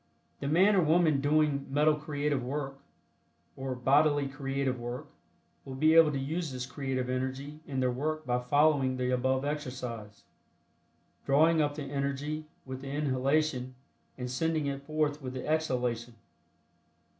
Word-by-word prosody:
The 140 - -3
man 185 +8 +5
or 190 - +5
woman 160 -3 +3
doing 145 -1 +2
metal 150 +3 +4
creative 150 -2 -1
work, 135 +1 -4 0.8
or 130 -1 -4
bodily 145 +3 +3
creative 135 -1 -2
work, 120 +5 -5 0.6
will 135 -1 -7
be 155 +4 +4
able 165 -2 +7
to 140 - -2
use 155 +4 -2
this 125 -1 -4
creative 130 -1 -3
energy 130 +3 -3
in 135 -2 -2
their 125 -1 +2
work 155 +5 -2
by 125 0 +1
following 135 0 +3
the 125 0 0
above 130 +2 +1
exercise, 125 -8 -5 1.0
drawing 160 +4 +4
up 145 -1 0
the 150 - -4
energy 140 +2 -3 0.2
with 130 0 -6
the 135 - -7
inhalation 135 -1 0 0.4
and 125 -1 -4
sending 155 +3 0
it 140 -1 -3
forth 155 -1 0
with 130 -1 -5
the 130 - -5
exhalation. 125 -7 -1
140 Hz, 145 wpm, -30 LUFS, 130-150 Hz, 1.0 s, able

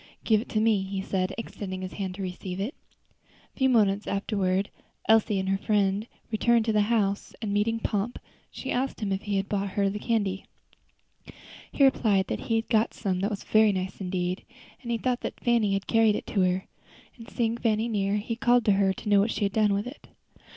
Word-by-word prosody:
"Give 215 -2 +3
it 245 - -11
to 215 - 0
me," 215 -2 +3
he 195 0 -4
said, 190 0 -1
extending 190 -4 -6
his 185 - -6
hand 190 -2 -4
to 195 - -5
receive 180 0 -5
it. 215 +9 -2 0.8
A - - -33
few 265 0 +4
moments 210 -4 +2
afterward 195 -1 0 0.4
Elsie 220 -2 +4
and 190 0 -2
her 195 0 +1
friend 205 0 +1 0.2
returned 230 +1 +3
to 220 - +1
the 210 - +4
house, 200 -4 0
and 210 -3 -3
meeting 225 +2 +1
Pomp, 210 +2 -2 0.3
she 265 - -6
asked 265 +2 -1
him 205 -3 -2
if 190 0 -1
he 205 -1 -2
had 195 0 -1
brought 200 -1 -1
her 200 +1 +1
candy. 205 -2 -1 1.3
He 280 - +2
replied 215 -8 +3
that - - -2
he 225 - +3
had 225 0 0
got 220 -1 +1
some 190 -4 -1
that 200 +2 0
was 205 -3 -5
very 215 -1 +4
nice 190 0 -4
indeed, 180 0 -2 0.4
and 240 - -8
he 235 - +1
thought 250 +1 -1
that - - -5
Fanny 230 -4 +2
had 195 0 -1
carried 225 -2 +3
it - - -4
to 200 - 0
her; 185 +1 +1 0.5
and 230 -1 -12
seeing 230 -2 0
Fanny 225 -1 +1
near, 200 -3 0
he 210 +2 -2
called 240 -1 +3
to 210 - +5
her 195 -1 +3
to 190 - -10
know 205 -1 +5
what 205 +3 +2
she 210 - -1
had 200 - -2
done 215 -2 +3
with 200 +1 0
it. 255 +4 -10
205 Hz, 215 wpm, -27 LUFS, 195-225 Hz, 1.3 s, to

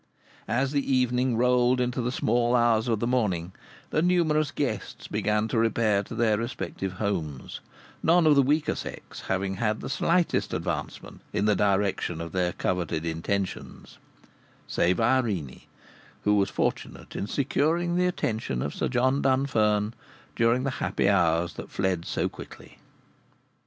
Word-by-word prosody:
As 130 +4 0
the 140 -1 -1
evening 125 -1 +2
rolled 125 +1 +3
into 125 0 0
the 120 +1 -1
small 120 -1 +1
hours 120 -1 +3
of 115 -3 +1
the 120 - -1
morning, 100 -9 0 0.4
the 155 - +2
numerous 160 -4 +2
guests 130 -7 -4
began 105 +1 0
to 115 - +1
repair 110 -2 +2
to 105 - -8
their 110 -2 +2
respective 115 -5 -4
homes, 85 -9 -3 0.4
none 170 0 +4
of 155 - +6
the 140 - +6
weaker 145 +3 +1
sex - - -8
having 95 0 -1
had 110 0 0
the - - -5
slightest 170 +5 +1
advancement - - -5
in 100 - 0
the 105 -1 +3
direction 100 -4 0
of 85 0 -5
their 90 -1 0
coveted 85 -3 -2
intentions, 90 +4 -4 0.7
save 90 +1 +1
Irene, 110 - 0 0.6
who 105 - +3
was 100 -1 +2
fortunate - - -3
in 100 - -3
securing 160 +7 0
the 180 0 +2
attention 110 - -2
of 70 - -3
Sir - - -1
John 130 +2 +1
Dunfern 110 -6 +2 0.4
during 115 +2 +2
the 135 - -1
happy - - 0
hours 85 -3 +2
that - - -8
fled 95 -3 -1
so - - -1
quickly. - - -12
115 Hz, 150 wpm, -26 LUFS, 95-130 Hz, 0.7 s, of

